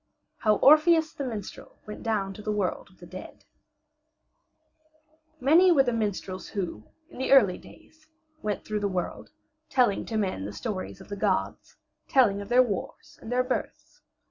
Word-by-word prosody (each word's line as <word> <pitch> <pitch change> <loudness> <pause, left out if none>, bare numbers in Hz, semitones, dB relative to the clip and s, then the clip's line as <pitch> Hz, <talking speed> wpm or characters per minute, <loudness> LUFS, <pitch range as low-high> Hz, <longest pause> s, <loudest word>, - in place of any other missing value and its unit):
HOW 215 -1 +2
ORPHEUS 310 +2 +6
THE 280 - -5
MINSTREL 220 -6 -7
WENT 210 - -8
DOWN 205 -4 -1
TO 210 - -10
THE 215 - -3
WORLD 205 -3 -2
OF - - -24
THE - - -13
DEAD - - -11 1.9
Many 325 +8 +5
were 280 -5 +5
the 245 -2 -1
minstrels 200 -4 -3
who, 175 - -5 0.3
in - - -11
the 260 - -1
early 210 -10 +5
days, 315 -1 -18 0.3
went 210 -1 -3
through 215 -1 -2
the 205 - 0
world, 185 -3 -4 0.4
telling 245 -6 +2
to 225 - -3
men 185 - -2
the 105 - -6
stories 195 -4 -5
of 190 - -14
the 205 - -4
gods, - - -2 0.3
telling 225 -8 +3
of 200 - -9
their 250 +1 +6
wars 210 -6 -6
and 225 - -8
their 250 +1 +2
births. 255 0 -5
215 Hz, 170 wpm, -27 LUFS, 200-260 Hz, 1.9 s, ORPHEUS